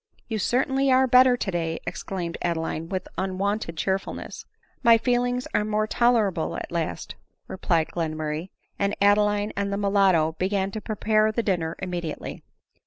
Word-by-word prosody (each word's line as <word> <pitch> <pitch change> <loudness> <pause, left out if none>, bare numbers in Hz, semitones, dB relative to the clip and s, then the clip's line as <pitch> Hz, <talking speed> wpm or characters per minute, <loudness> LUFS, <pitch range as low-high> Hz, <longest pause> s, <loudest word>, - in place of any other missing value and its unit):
"You 220 -2 -2
certainly 265 +5 +1
are 260 +1 +5
better 255 0 +6
today," 170 -6 -2
exclaimed 180 -1 -4
Adeline 165 -1 -2
with 185 -1 -3
unwonted 190 -2 -2
cheerfulness. 190 +2 -3 0.2
" - - -39
My 230 -1 +7
feelings 245 +1 0
are 210 - +2
more 215 0 0
tolerable, 215 -7 +1
atleast," 165 - -4 0.3
replied 170 -4 0
Glen 160 -2 -2
murray; 155 +3 -3 0.3
and 200 0 0
Adeline 205 +1 +3
and 200 0 -1
the 200 - -1
mulatto 195 -5 +3
began 195 +1 0
to 215 - -5
prepare 215 0 +1
the 235 +2 -1
dinner 170 -5 -1
immediately. 175 -4 -5
200 Hz, 145 wpm, -25 LUFS, 170-215 Hz, 0.3 s, My